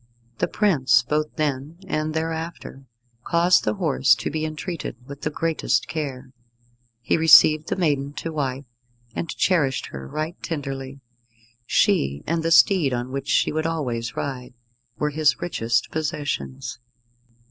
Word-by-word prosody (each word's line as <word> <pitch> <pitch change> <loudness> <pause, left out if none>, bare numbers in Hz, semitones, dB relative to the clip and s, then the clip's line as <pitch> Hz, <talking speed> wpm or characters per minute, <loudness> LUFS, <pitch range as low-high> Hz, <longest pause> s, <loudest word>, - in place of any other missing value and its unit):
The - - +1
prince 135 - +3
both 150 +3 -1
then 150 0 -2
and 155 -2 -2
thereafter 160 -4 -5 0.4
caused 170 +4 +3
the 105 - 0
horse 65 -8 +3
to - - -4
be 155 0 -2
entreated 155 +3 -5
with 140 +1 -10
the - - -1
greatest 165 +1 0
care. 135 -5 -5 0.7
He 120 - +1
received 155 -1 +7
the - - -1
maiden 145 -6 0
to 165 - -5
wife, 135 -2 -2 0.5
and 165 - -4
cherished 150 -8 +1
her 65 0 -7
right 155 - -4
tenderly. 135 -3 -5 0.7
She, 70 +1 +2
and 165 +1 0
the 165 - 0
steed 165 -5 +5
on 120 +1 -4
which 140 0 -4
she - - +3
would 155 +1 -1
always 125 -8 -3
ride, 125 -3 -5 0.4
were 150 +4 -1
his 150 0 +2
richest 115 -10 -1
possessions. 145 - -3
150 Hz, 140 wpm, -23 LUFS, 130-160 Hz, 0.7 s, received